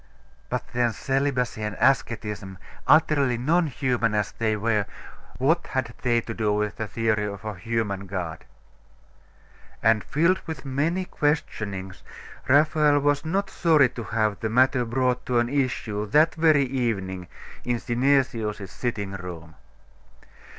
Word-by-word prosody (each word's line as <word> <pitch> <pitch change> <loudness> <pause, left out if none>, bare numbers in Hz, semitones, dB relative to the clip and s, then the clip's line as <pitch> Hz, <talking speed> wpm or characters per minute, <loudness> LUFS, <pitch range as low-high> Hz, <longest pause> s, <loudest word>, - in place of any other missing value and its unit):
But - - -2
then, 120 -1 +1
celibacy 135 -4 -1
and 105 -1 -3
asceticism, 105 -7 0 0.3
utterly 140 -6 +4
non 160 +7 +2
human 125 -6 0
as 105 -1 0
they 110 -1 -1
were, 105 -1 0 0.5
what 160 +7 +1
had 130 -3 -2
they 120 -2 +2
to 115 - -6
do 110 -2 0
with 105 0 -1
the 110 - -3
theory 110 -1 0
of 100 +1 -7
a 110 - -3
human 100 -1 -3
God? 90 -4 -5 1.4
And 110 -1 +4
filled 170 +5 +2
with 160 -2 -6
many 155 +8 0
questionings, 100 - -2 0.5
Raphael 150 +1 +4
was 145 0 +1
not 195 +5 -1
sorry 155 -6 +4
to 115 -2 -7
have 110 -1 0
the 110 - -2
matter 125 +2 +3
brought 125 +1 0
to 125 - +1
an 120 0 +2
issue 125 -6 -1
that 155 +9 +4
very 155 -3 +4
evening 100 -8 -2 0.4
in 120 -1 0
Synesius's 120 -6 0
sitting 105 -2 -3
room. 90 -4 -8
120 Hz, 135 wpm, -25 LUFS, 105-140 Hz, 1.4 s, utterly